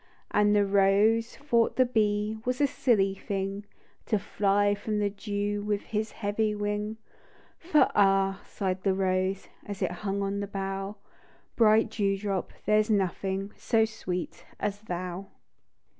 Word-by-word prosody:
And 210 0 +3
the 205 -1 +4
rose 200 +3 +3
thought 240 -5 +1
the 255 - +4
bee 215 -2 0
Was 250 +1 -1
a 290 - +5
silly 215 -8 +2
thing, 195 +1 -4 0.4
To 215 - +2
fly 205 +1 +1
from 210 +1 -3
the 205 -1 0
dew 205 0 -2
With 205 0 -1
his 215 0 -3
heavy 210 0 -1
wing; 210 +1 -2 0.6
For 320 -3 +4
" - - -25
Ah," 195 -1 +3
sighed 185 -1 -2
the 190 0 +1
rose, 190 0 0 0.2
As 205 -1 -5
it 175 - 0
hung 200 -1 -1
on 200 +1 -2
the 200 - -3
bough, 195 +1 -4 0.3
" - - -32
Bright 220 -1 +4
dew 195 -2 0
drop, 195 -2 -3
there's 215 +1 +3
nothing 195 0 0
So 225 -2 +2
sweet 180 -5 -5 0.2
as 205 0 -2
thou 180 -1 -5
205 Hz, 155 wpm, -28 LUFS, 195-215 Hz, 0.6 s, a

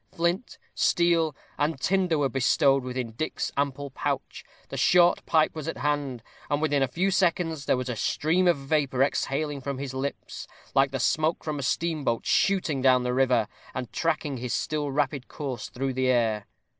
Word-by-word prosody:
Flint, 170 +7 -1 0.2
steel, 165 -4 +2 0.2
and 145 -1 0
tinder 185 -1 +1
were 145 -2 +2
bestowed 135 +1 +3
within 125 -2 -4
Dick's 155 +8 -3
ample 140 0 -2
pouch, - - -3 0.3
the - - -6
short 175 -1 +4
pipe 155 -1 +3
was 155 -1 -6
at 165 - -3
hand, 140 -4 -2 0.3
and 145 -1 +1
within 145 -2 +1
a 135 - +3
few 185 +9 0
seconds 170 -5 +1
there 130 - +2
was 125 0 -3
a 125 - -2
stream 165 +10 +1
of 175 - +4
vapor 135 -2 +1
exhaling 140 +1 -1
from 140 0 -4
his 135 -1 -5
lips, 135 +2 -5 0.3
like 135 0 +4
the 135 0 -3
smoke 155 +6 +1
from 150 -2 -3
a - - -3
steamboat 145 -3 -1
shooting 180 -8 +2
down 130 -1 +4
the 125 0 -1
river, 125 -4 +2 0.3
and 125 -2 -5
tracking 155 -4 -1
his 125 0 -2
still 150 -2 -2
rapid 140 -2 -1
course 130 -7 -5
through 135 +1 -3
the 130 0 0
air. 115 -4 +1
140 Hz, 180 wpm, -26 LUFS, 130-160 Hz, 0.3 s, short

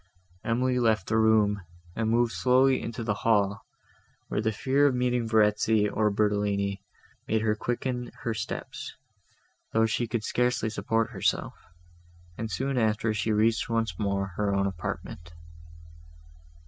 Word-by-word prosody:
Emily 125 +2 +1
left 110 -5 +2
the 110 - 0
room, 105 -2 +3 0.3
and 110 -1 0
moved 120 +1 +2
slowly 130 +2 +3
into 115 0 -5
the 110 -2 0
hall, 105 -1 +2 0.7
where - - -1
the 110 0 +1
fear 135 +6 +2
of 135 - +1
meeting 125 -1 0
Verezzi, 105 -1 +3
or 105 +1 +1
Bertolini, 100 -1 0 0.5
made 110 0 +1
her 110 -1 +2
quicken 125 +2 -3
her 115 - -1
steps, 110 - -6 0.8
though 110 0 +4
she 115 +2 -1
could 115 -1 -2
scarcely 125 -1 0
support 115 +2 -1
herself; 95 -5 -1 0.8
and 110 +3 -4
soon 135 +3 -1
after 110 0 +1
she 105 +1 -1
reached 110 +2 +2
once 115 -7 -1
more 100 -2 -1
her 105 -1 +1
own 100 0 +1
apartment. 80 -2 -5
110 Hz, 140 wpm, -27 LUFS, 105-120 Hz, 0.8 s, though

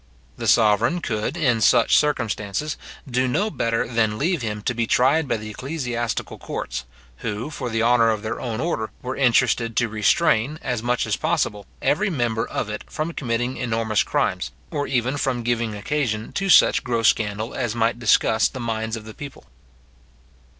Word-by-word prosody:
The - - -4
sovereign 115 - +4
could, 115 +1 -2
in 125 -9 +2
such - - +5
circumstances, 115 -2 0 0.3
do 130 0 +1
no 205 +12 0
better 115 - 0
than 110 -3 0
leave 170 +4 0
him 105 -2 -4
to 125 - 0
be 115 -1 -1
tried 140 +7 +3
by 120 - 0
the 105 0 -7
ecclesiastical 125 -3 -3
courts, 60 +1 -5 0.3
who, 115 - -4
for 130 -4 -4
the 115 0 0
honour 115 -1 +4
of 110 -1 -1
their 110 +2 -3
own 115 -3 -3
order, 130 -8 -1
were 130 +1 -3
interested 120 -3 +2
to 120 - +2
restrain, 115 +5 +2
as 125 -4 -2
much 120 +1 0
as 110 -1 -1
possible, 150 - -1 0.2
every 205 +7 +2
member 120 -8 -1
of - - -3
it 105 0 -5
from 155 +2 -3
committing 120 -1 -2
enormous 115 -3 0
crimes, - - 0 0.2
or 145 - -2
even 130 +1 0
from 130 -4 -1
giving 115 -2 -1
occasion 110 -1 -2
to 195 0 -1
such - - +6
gross 115 -4 +1
scandal 110 +1 -1
as 120 -3 -2
might 115 +1 +1
disgust 110 -1 +3
the 130 - -6
minds 115 -1 -2
of 110 -1 -8
the 110 - -9
people. 140 +3 -10
120 Hz, 175 wpm, -23 LUFS, 110-130 Hz, 0.3 s, such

